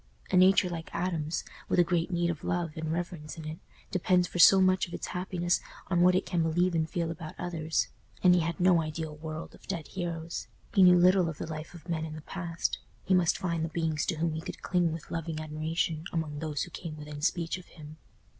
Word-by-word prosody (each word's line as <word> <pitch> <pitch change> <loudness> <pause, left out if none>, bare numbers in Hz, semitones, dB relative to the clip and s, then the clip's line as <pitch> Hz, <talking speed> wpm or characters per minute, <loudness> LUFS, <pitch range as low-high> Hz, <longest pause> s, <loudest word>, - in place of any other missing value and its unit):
A - - +2
nature 185 +1 +6
like 165 -2 -5
Adam's, 170 -3 -1 0.3
with - - +2
a 175 - +7
great 170 0 0
need 175 -1 +1
of 155 -2 -7
love 175 -2 -1
and 160 0 -3
reverence 165 -3 -4
in 160 - -7
it, 155 +1 -6 0.3
depends 180 -1 +3
for 175 - -5
so 195 +3 +9
much 185 0 +3
of 170 - -7
its - - -4
happiness 180 -1 -1 0.3
on 175 -1 +3
what 180 +1 +6
it 185 - +1
can 175 -2 0
believe 175 +3 +2
and 160 -1 0
feel 170 -1 -1
about 155 -1 -7
others! 165 -2 -1 0.4
And 180 -1 +7
he 180 - +4
had 165 -1 -2
no 180 -2 +5
ideal 155 0 -4
world 155 +1 -6
of - - -17
dead 170 -6 -4
heroes; 170 -2 -4 0.3
he 200 - +5
knew 180 -1 +8
little 180 0 +5
of 155 - -6
the - - -4
life 160 +1 -7
of 170 -1 -13
men 165 -2 -1
in 155 -1 -5
the 155 - -7
past; 170 0 -3 0.2
he 190 - +1
must 180 -3 +4
find 170 -4 -1
the 165 - -1
beings 160 -2 -1
to 175 - 0
whom 160 +1 0
he 160 - -3
could - - -8
cling 175 -2 +2
with 160 0 -7
loving 165 -1 -3
admiration 155 +1 -2
among 155 -3 -2
those 150 -2 -2
who 175 - -8
came 160 -2 -6
within 150 -1 -8
speech 170 +2 0
of 180 - -15
him. 155 -1 -12
170 Hz, 230 wpm, -29 LUFS, 160-180 Hz, 0.4 s, so